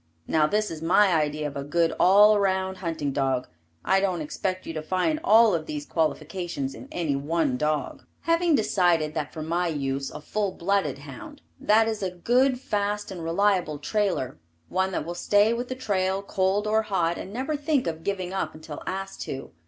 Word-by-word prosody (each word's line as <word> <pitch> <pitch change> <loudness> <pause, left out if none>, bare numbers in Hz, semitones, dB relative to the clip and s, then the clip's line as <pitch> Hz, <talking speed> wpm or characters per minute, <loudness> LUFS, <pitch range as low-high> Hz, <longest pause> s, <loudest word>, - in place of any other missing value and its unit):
Now 155 - +2
this 210 +4 0
is 160 -1 -7
my 180 +3 +4
idea 150 -1 0
of 145 - -4
a 140 - -3
good 165 +3 +1
all 205 +3 +7
around 190 -1 0
hunting 165 -6 -3
dog. 135 -2 0 0.4
I 190 - +4
don't 190 -3 0
expect 185 +5 -3
you 165 - -5
to 155 - -3
find 185 - 0
all 220 0 +6
of 160 -2 -2
these 150 -1 -4
qualifications 160 -3 -2
in - - -10
any 160 -5 -1
one 145 -1 0
dog. 150 +1 -1 0.2
Have 330 +2 +2 0.2
decided 175 - +2
that 150 -2 -3
for 155 - -6
my 170 +3 0
use, 135 -3 -2
a - - -8
full 200 +5 -2
blooded 175 -7 0
hound. 135 - -11 0.2
That 220 +1 +4
is 220 -1 -2
a 190 - 0
good, 245 +8 +2
fast 205 -5 -2
and 175 -3 -6
reliable 180 -2 +1
trailer, 175 - -1 0.3
one 190 +1 0
that 150 - -2
will 170 - -4
stay 205 +5 +3
with 240 +1 -3
the 255 - -4
trail, 195 -5 -1
cold 195 +1 0
or 215 +1 +2
hot, 175 -5 -1
and 190 - -7
never 265 +7 -2
think 290 -2 0
of 160 -1 -4
giving 190 -2 -3
up 195 - -2
until 155 -1 -9
asked 195 +1 -4
to. 135 0 -6
180 Hz, 190 wpm, -26 LUFS, 155-205 Hz, 0.4 s, all